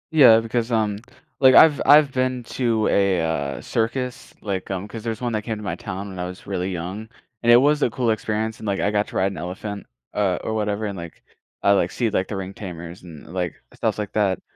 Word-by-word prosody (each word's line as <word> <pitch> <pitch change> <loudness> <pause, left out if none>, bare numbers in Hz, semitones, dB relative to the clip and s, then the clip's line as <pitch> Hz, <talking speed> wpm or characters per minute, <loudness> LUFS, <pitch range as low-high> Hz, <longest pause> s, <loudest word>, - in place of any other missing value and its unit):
Yeah, 120 -7 +8
because, 115 +1 -2
um, 105 -2 +1 0.4
like, 130 -1 +7
I've 155 -3 +7
I've 145 0 +7
been 130 -1 -1
to 115 -3 0
a, 100 -3 +2
uh, 70 -4 -2
circus, 125 +2 -3
like, 95 -3 -4
um, 95 0 -3
'cause 110 +1 -8
there's 115 0 -3
1 120 -1 -1
that 110 -1 -1
came 110 0 -3
to 105 - -8
my 90 -5 -3
town 100 +1 -6
when 95 -1 -8
I 90 - -2
was 90 +1 -9
really 95 -1 -2
young, 95 +5 -5 0.3
and 120 - 0
it - - +9
was 145 +3 +3
a - - +3
cool 120 0 0
experience, 110 0 -2
and, 110 - -7
like, 100 -1 0
I 105 - +1
got 105 0 +1
to - - -12
ride 95 +1 +1
an - - -8
elephant, 100 +3 -6 0.3
uh, 95 -4 +1
or 110 - -2
whatever 105 0 -1
and, 100 -2 -4
like, 85 -1 -9 0.4
I, 100 - +5
like, 95 -3 +2
see, 120 -2 0
like, 95 -3 0
the 105 - -5
ring 95 0 -5
tamers 85 -4 -8
and, 80 -4 -12
like, 90 -2 -2 0.2
stuff - - -1
like 105 -2 -4
that. 100 -3 +1
105 Hz, 235 wpm, -23 LUFS, 95-115 Hz, 0.4 s, it